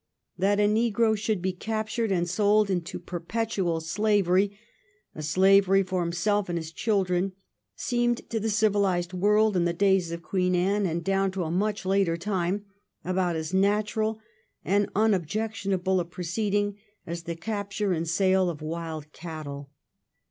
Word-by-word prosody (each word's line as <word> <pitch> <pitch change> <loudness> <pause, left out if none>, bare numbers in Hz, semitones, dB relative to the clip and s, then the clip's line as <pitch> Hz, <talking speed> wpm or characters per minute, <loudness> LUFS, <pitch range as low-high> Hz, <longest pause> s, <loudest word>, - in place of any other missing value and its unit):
That 200 +2 +2
a 205 - +4
negro 220 0 +2
should 210 -3 -2
be 190 0 0
captured 220 +3 -2
and 175 -2 +1
sold 205 +3 +3
into 175 -2 -2
perpetual 180 0 -2
slavery, 200 +2 +1 0.6
a - - -7
slavery 195 +5 +4
for 185 -1 -2
himself 185 +4 0
and 170 - -1
his 160 -1 -5
children, 190 -2 0 0.4
seemed 240 -1 0
to 225 - 0
the 220 - -2
civiUsed 200 -4 +1
world 210 +3 +3
in 175 -1 +2
the 170 - +1
days 190 -1 +2
of 170 0 -6
Queen 180 -1 0
Anne, 195 +3 +1
and 170 0 -2
down 195 +1 +1
to 190 -2 -2
a 160 - -3
much 205 +3 -1
later 190 -3 +2
time, 190 +1 -1 0.4
about 180 -1 0
as 160 +2 -4
natural 210 +3 +1 0.5
and 205 +1 +2
as - - -13
unobjectionable 195 -1 0
a 175 - -1
proceeding 200 +4 -2 0.3
as 170 0 -5
the 170 0 -5
capture 200 +1 -2
and 165 -1 -1
the - - -4
sale 185 +1 +3
of 160 -4 -5
wild 160 -1 -5
cattle. 150 -4 -7
190 Hz, 155 wpm, -27 LUFS, 175-210 Hz, 0.6 s, a